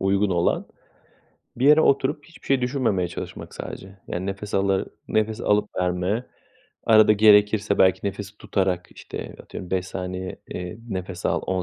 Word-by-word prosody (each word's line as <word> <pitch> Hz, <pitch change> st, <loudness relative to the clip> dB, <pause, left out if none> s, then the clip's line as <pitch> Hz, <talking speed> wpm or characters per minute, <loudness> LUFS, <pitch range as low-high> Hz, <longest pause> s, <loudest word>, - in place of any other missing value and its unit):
uygun 100 Hz, +1 st, +2 dB
olan 85 Hz, -1 st, +1 dB, 0.9 s
bir 130 Hz, +3 st, +1 dB
yere 150 Hz, +2 st, +7 dB
oturup 145 Hz, +1 st, +2 dB
hiçbir 170 Hz, -, -17 dB
şey 135 Hz, -2 st, +3 dB
düşünmemeye 120 Hz, -9 st, 0 dB
çalışmak -, -, -7 dB
sadece. 95 Hz, +1 st, -8 dB
Yani 90 Hz, +2 st, -3 dB
nefes 100 Hz, +1 st, -5 dB
alı 95 Hz, -1 st, +2 dB, 0.2 s
nefes 110 Hz, 0 st, 0 dB
alıp 105 Hz, 0 st, +2 dB
verme, 90 Hz, +6 st, 0 dB, 0.6 s
arada 110 Hz, -1 st, +7 dB
gerekirse 105 Hz, -1 st, +5 dB
belki 95 Hz, +1 st, +4 dB
nefes 100 Hz, +1 st, -5 dB
tutarak, 95 Hz, -3 st, -1 dB
işte, -, -, -8 dB
atıyorum 90 Hz, -, -9 dB
5 95 Hz, -1 st, 0 dB
saniye, 95 Hz, 0 st, -5 dB
eee, 90 Hz, +3 st, -6 dB
nefes 95 Hz, -3 st, -4 dB
al, -, -, +1 dB
10 95 Hz, -1 st, 0 dB
100 Hz, 150 wpm, -24 LUFS, 95-110 Hz, 0.9 s, yere